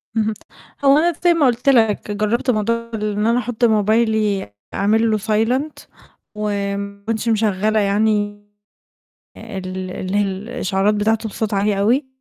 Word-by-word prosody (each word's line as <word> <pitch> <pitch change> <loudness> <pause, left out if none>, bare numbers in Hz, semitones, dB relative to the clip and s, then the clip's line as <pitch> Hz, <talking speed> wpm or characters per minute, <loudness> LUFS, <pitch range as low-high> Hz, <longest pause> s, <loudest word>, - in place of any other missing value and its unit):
اهم، 220 0 +1 0.5
هو 275 +1 +6
أنا 340 +2 +2
زي 350 - +5
ما 320 -4 +2
قلت 245 +2 +2
لك- 220 -5 +2
جربت 215 +5 0
موضوع 230 +2 -1
إن 210 0 -1
أنا 235 +1 +3
أحط 245 -1 -1
موبايلي 215 - +1 0.2
أعمل 220 +3 +2
له 215 - +2
silent، 225 +8 0 0.6
وما 200 -1 -3
اكونش 225 +1 -2
مشغلة 215 0 +1
يعني 205 0 0 0.9
ال 185 -3 -6
اللي 185 +2 -3
هي - - +3
الإشعارات 195 0 -1
بتاعته 220 +1 0
بصوت 215 0 -3
عالي 200 0 +1
أوي. 255 +7 +2
215 Hz, 140 wpm, -19 LUFS, 205-230 Hz, 0.9 s, هو